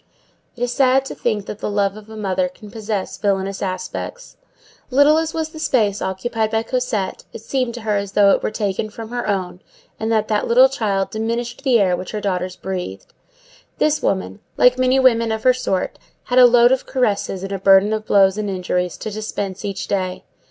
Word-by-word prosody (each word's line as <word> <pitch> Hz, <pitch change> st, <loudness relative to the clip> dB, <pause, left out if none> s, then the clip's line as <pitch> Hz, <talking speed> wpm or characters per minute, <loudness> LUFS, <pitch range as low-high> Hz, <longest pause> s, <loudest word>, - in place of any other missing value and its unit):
It 245 Hz, -, -4 dB
is 245 Hz, -, 0 dB
sad 265 Hz, +1 st, +3 dB
to -, -, -6 dB
think 215 Hz, -4 st, -2 dB
that 210 Hz, -, -7 dB
the -, -, -3 dB
love 200 Hz, -1 st, 0 dB
of 215 Hz, 0 st, -12 dB
a 220 Hz, -, -9 dB
mother 185 Hz, -3 st, 0 dB
can 205 Hz, +3 st, -14 dB
possess 215 Hz, -3 st, -4 dB
villainous 195 Hz, -1 st, -1 dB
aspects. 185 Hz, -, -5 dB, 0.5 s
Little 285 Hz, +4 st, +5 dB
as 320 Hz, -1 st, -2 dB
was 320 Hz, -1 st, -2 dB
the 315 Hz, -, -11 dB
space 215 Hz, -9 st, +1 dB
occupied 220 Hz, +4 st, -2 dB
by 220 Hz, 0 st, 0 dB
Cosette, 230 Hz, -6 st, -2 dB
it -, -, -8 dB
seemed 255 Hz, -2 st, -2 dB
to 240 Hz, -, -7 dB
her 215 Hz, -2 st, 0 dB
as 200 Hz, 0 st, -4 dB
though 200 Hz, -1 st, +5 dB
it -, -, +2 dB
were -, -, -1 dB
taken 215 Hz, -1 st, -2 dB
from 220 Hz, +1 st, -9 dB
her 245 Hz, 0 st, -3 dB
own, 185 Hz, -3 st, -2 dB, 0.4 s
and 220 Hz, +1 st, -2 dB
that 215 Hz, -1 st, +1 dB
that 210 Hz, -1 st, 0 dB
little 255 Hz, +3 st, +6 dB
child 200 Hz, -7 st, -1 dB
diminished 235 Hz, +4 st, -3 dB
the 255 Hz, -4 st, +4 dB
air 185 Hz, -3 st, +3 dB
which 185 Hz, +3 st, -7 dB
her 215 Hz, -, -2 dB
daughters 185 Hz, -2 st, -2 dB
breathed. 180 Hz, -, -6 dB, 0.6 s
This 305 Hz, 0 st, +1 dB
woman, 190 Hz, +2 st, -1 dB, 0.2 s
like 250 Hz, 0 st, +5 dB
many 255 Hz, +1 st, +3 dB
women 230 Hz, -3 st, +3 dB
of 220 Hz, 0 st, -3 dB
her 255 Hz, -, +5 dB
sort, 195 Hz, -7 st, -2 dB, 0.2 s
had 250 Hz, +1 st, +2 dB
a 250 Hz, -, +9 dB
load 240 Hz, 0 st, +5 dB
of 260 Hz, -, 0 dB
caresses 205 Hz, -6 st, -1 dB
and 195 Hz, -, -5 dB
a 195 Hz, -, -3 dB
burden 195 Hz, +2 st, +5 dB
of 215 Hz, 0 st, -3 dB
blows 195 Hz, 0 st, +4 dB
and 210 Hz, -1 st, -2 dB
injuries 180 Hz, -1 st, -2 dB
to 215 Hz, -, -6 dB
dispense 205 Hz, -2 st, -5 dB
each 200 Hz, -2 st, -4 dB
day. 185 Hz, -2 st, -2 dB
215 Hz, 210 wpm, -20 LUFS, 195-245 Hz, 0.6 s, a